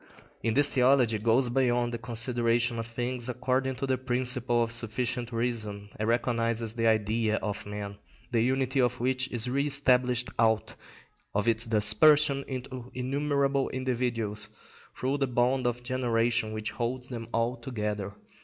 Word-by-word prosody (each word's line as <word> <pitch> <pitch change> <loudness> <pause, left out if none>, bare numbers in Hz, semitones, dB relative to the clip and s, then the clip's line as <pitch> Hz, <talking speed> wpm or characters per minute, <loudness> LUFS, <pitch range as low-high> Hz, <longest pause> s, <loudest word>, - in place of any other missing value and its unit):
In 115 - 0
this 145 +1 +5
theology 125 -4 +3
goes 120 +3 +2
beyond 120 -2 +1
the 120 - -3
consideration 120 0 +1
of 115 - -4
things 120 +1 -3
according 130 +1 -1
to 130 - -3
the 130 -2 0
principle 125 -1 0
of 115 - -3
sufficient 120 +1 0
reason, 110 -4 -3
and 110 +1 -2
recognises 115 -1 0
the 115 -1 0
Idea 110 0 +1
of 105 -1 -4
man, 105 0 -6 0.3
the 115 -2 +2
unity 130 +2 +1
of 125 0 0
which 130 +1 0
is 120 0 +1
re 140 +3 0
established 125 -3 +2
out 110 -1 +2 0.6
of 105 +2 0
its 115 0 +2
dispersion 140 +7 +4
into 130 -1 -6
innumerable 140 +1 0
individuals 120 -5 -2 0.5
through 135 +3 -1
the 135 - +1
bond 125 +1 +1
of 120 0 -2
generation 120 -3 0
which 110 0 -4
holds 125 +1 -3
them 115 -3 -6
all 115 +2 0
together. 105 -6 -4
120 Hz, 150 wpm, -28 LUFS, 115-130 Hz, 0.6 s, this